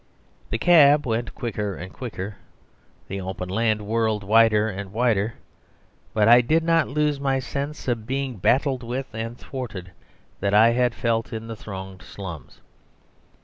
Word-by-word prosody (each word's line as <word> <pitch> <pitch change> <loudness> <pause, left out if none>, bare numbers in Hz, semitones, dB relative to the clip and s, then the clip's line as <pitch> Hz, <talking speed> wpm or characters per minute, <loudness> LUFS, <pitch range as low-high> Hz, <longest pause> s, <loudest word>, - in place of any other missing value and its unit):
The 110 - -1
cab 150 -1 +6
went 115 0 -2
quicker 105 -4 -3
and 95 +2 -9
quicker. 105 -5 -6 0.7
The 95 0 -4
open 95 -1 -5
land 110 +1 +1
whirled 110 -1 0
wider 110 +1 +4
and 100 -2 -6
wider; 110 -1 +1 0.8
but 105 -1 +2
I 120 +1 +8
did 155 +7 +2
not 165 -2 +3
lose 150 0 0
my 135 -1 +1
sense 140 +3 -5
of 115 -3 -2
being 135 -2 -2
battled 130 - +2
with 125 +1 -5
and 115 +2 -5
thwarted 110 -11 -7 0.5
that 100 +1 +1
I 110 +2 +7
had 120 0 +1
felt 115 -1 -1
in 110 -1 -5
the 115 0 -6
thronged 95 -3 -8
slums. 90 -7 -9
115 Hz, 150 wpm, -24 LUFS, 105-130 Hz, 0.8 s, I